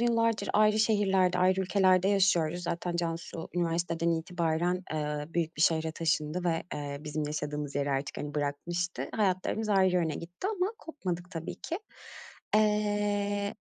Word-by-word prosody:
yıllardır 230 -3 +2
ayrı 215 +1 +4
şehirlerde, 195 -4 +3
ayrı 185 +1 +3
ülkelerde 185 0 +3
yaşıyoruz. 180 -4 +2
Zaten 170 0 -2
Cansu 165 -1 -3
üniversiteden 170 -1 0
itibaren, 170 +1 0
eee, 150 -1 -2
büyük 165 -2 -1
bir 155 - +1
şehre 160 -1 +2
taşındı 160 +1 -1
ve, 165 -2 +1
eee, 145 -1 -4
bizim 150 0 -3
yaşadığımız 150 -1 -3
yeri 140 0 0
artık, 135 0 -2
hani, 145 0 -5
bırakmıştı. 170 +5 -2
Hayatlarımız 210 +1 0
ayrı 190 -2 +4
yöne 165 -4 +1
gitti 175 - -6
ama 395 -2 0
kopmadık 180 - -5
tabii 165 -3 -5
ki. 335 - -4 0.8
Eee, 205 -1 +1
175 Hz, 140 wpm, -30 LUFS, 160-200 Hz, 0.8 s, ayrı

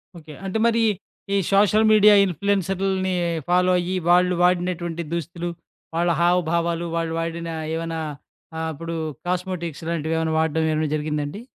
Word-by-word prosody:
Okay. 155 -2 -11
అంటే 195 +3 -2
మరీ 230 0 +2 0.5
ఈ - - +3 0.2
సోషల్ 210 +2 +4
మీడియా 210 -1 +7
ఇన్‌ఫ్లుయెన్సరులని 190 +1 0 0.3
ఫాలో 180 +1 +3
అయ్యి, 180 +2 -2
వాళ్ళు 180 +1 +4
వాడినటువంటి 175 -1 0
దుస్తులు, 170 +1 -3 0.5
వాళ్ళ 170 +1 +1
హావభావాలు. 170 -1 +1
వాళ్ళు 165 -1 -1
వాడిన 165 0 -4 0.3
ఏవన్నా 165 0 -3 0.6
ఆహ్, 160 0 -2
అప్పుడు 165 +3 -6 0.3
కాస్మోటిక్స్ 180 -3 -3
లాంటివి 165 -1 -1
ఏవన్నా 160 -1 -1
వాడ్డం 160 0 +1
ఏమన్నా 155 0 0
జరిగిందా 150 0 -2
అండి? 200 +9 -7
170 Hz, 135 wpm, -23 LUFS, 165-185 Hz, 0.6 s, మీడియా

